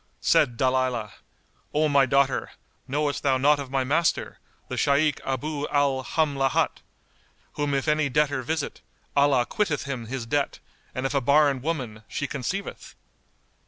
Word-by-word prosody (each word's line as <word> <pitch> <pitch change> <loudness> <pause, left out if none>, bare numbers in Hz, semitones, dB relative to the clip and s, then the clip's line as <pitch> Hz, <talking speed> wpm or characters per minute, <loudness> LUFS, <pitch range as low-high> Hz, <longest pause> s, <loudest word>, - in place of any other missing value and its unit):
Said 120 -2 +3
Dalilah, 130 -4 0 0.6
"O 155 +1 +3
my 140 -2 +4
daughter, 135 -1 +1 0.3
knowest 145 +1 -1
thou 135 -2 +2
not 145 +3 +4
of 140 -2 -6
my 135 0 0
master, 155 +5 0 0.3
the - - -4
Shaykh 145 +1 +2
Abú 145 +3 -3
al 140 -2 +2
Hamlát,[FN#189] 140 -2 +1 0.8
whom 145 -1 -1
if 135 +2 -1
any 150 -1 +2
debtor 145 -1 +1
visit, 155 +3 -3 0.3
Allah 140 -3 +4
quitteth 165 - -1
him 130 -5 -5
his 130 0 -4
debt, 140 +4 -1 0.4
and 130 - -2
if 135 - -1
a 140 - +2
barren 140 0 +3
woman, 130 -8 -3
she 145 - -3
conceiveth?" 140 +9 -5
140 Hz, 145 wpm, -25 LUFS, 130-150 Hz, 0.8 s, my